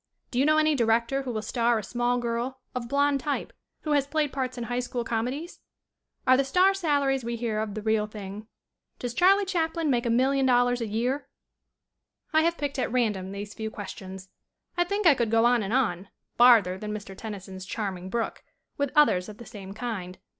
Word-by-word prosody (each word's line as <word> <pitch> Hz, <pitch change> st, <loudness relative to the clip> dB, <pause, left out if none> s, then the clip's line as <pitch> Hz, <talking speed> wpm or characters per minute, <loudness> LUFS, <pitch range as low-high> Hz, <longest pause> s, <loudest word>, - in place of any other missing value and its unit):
"Do 245 Hz, -, -1 dB
you 275 Hz, -, +4 dB
know 310 Hz, 0 st, +4 dB
any 310 Hz, 0 st, +4 dB
director 235 Hz, +1 st, +2 dB
who 265 Hz, -2 st, -4 dB
will 215 Hz, -2 st, -3 dB
star 235 Hz, +1 st, +1 dB
a 215 Hz, -, -3 dB
small 245 Hz, +3 st, 0 dB
girl, 240 Hz, +2 st, -2 dB
of 245 Hz, -2 st, -4 dB
blond 280 Hz, +1 st, +2 dB
type, 285 Hz, +1 st, -3 dB, 0.3 s
who 305 Hz, -, -3 dB
has 285 Hz, -2 st, +2 dB
played 300 Hz, -2 st, 0 dB
parts 255 Hz, -2 st, -3 dB
in 240 Hz, -, -3 dB
high 245 Hz, +1 st, -2 dB
school 245 Hz, -1 st, -3 dB
come 225 Hz, 0 st, -1 dB
dies?" 300 Hz, +7 st, -6 dB, 0.7 s
"Are 255 Hz, -, +6 dB
the 275 Hz, -, +3 dB
star 365 Hz, +8 st, +4 dB
salaries 285 Hz, -8 st, +1 dB
we 235 Hz, +1 st, -3 dB
hear 225 Hz, -2 st, -2 dB
of 215 Hz, -1 st, -3 dB
the 215 Hz, -, -5 dB
real 220 Hz, -1 st, +1 dB
thing?" 210 Hz, 0 st, -8 dB, 0.5 s
"Does 245 Hz, -1 st, -4 dB
Charlie 390 Hz, +6 st, +4 dB
Chaplin 330 Hz, -4 st, 0 dB
make 240 Hz, -1 st, +1 dB
$1,000,000 245 Hz, 0 st, +3 dB
a 230 Hz, -, -2 dB
year?" 245 Hz, +7 st, -1 dB, 1.1 s
I 315 Hz, -, +5 dB
have 335 Hz, +1 st, +1 dB
picked 285 Hz, -2 st, -3 dB
at 250 Hz, -, -1 dB
random 210 Hz, -7 st, 0 dB
these 205 Hz, +1 st, -6 dB
few 220 Hz, 0 st, -4 dB
questions. 190 Hz, -2 st, -8 dB, 0.5 s
I 350 Hz, 0 st, +2 dB
think 405 Hz, +2 st, -2 dB
I 325 Hz, -, +8 dB
could 235 Hz, -4 st, 0 dB
go 225 Hz, +1 st, +4 dB
on 240 Hz, -1 st, +4 dB
and 200 Hz, 0 st, -3 dB
on, 200 Hz, -8 st, 0 dB, 0.3 s
farther 225 Hz, -7 st, +6 dB
than 210 Hz, +1 st, -5 dB
Mr. 205 Hz, -2 st, -7 dB
Tennyson's 190 Hz, -3 st, -7 dB
charming 190 Hz, -4 st, -4 dB
brook, 230 Hz, +2 st, -3 dB, 0.4 s
with 285 Hz, -1 st, +1 dB
others 215 Hz, -11 st, +4 dB
of 210 Hz, -, -10 dB
the 235 Hz, -, -11 dB
same 200 Hz, -3 st, -9 dB
kind. 200 Hz, -5 st, -5 dB
240 Hz, 200 wpm, -27 LUFS, 215-275 Hz, 1.1 s, I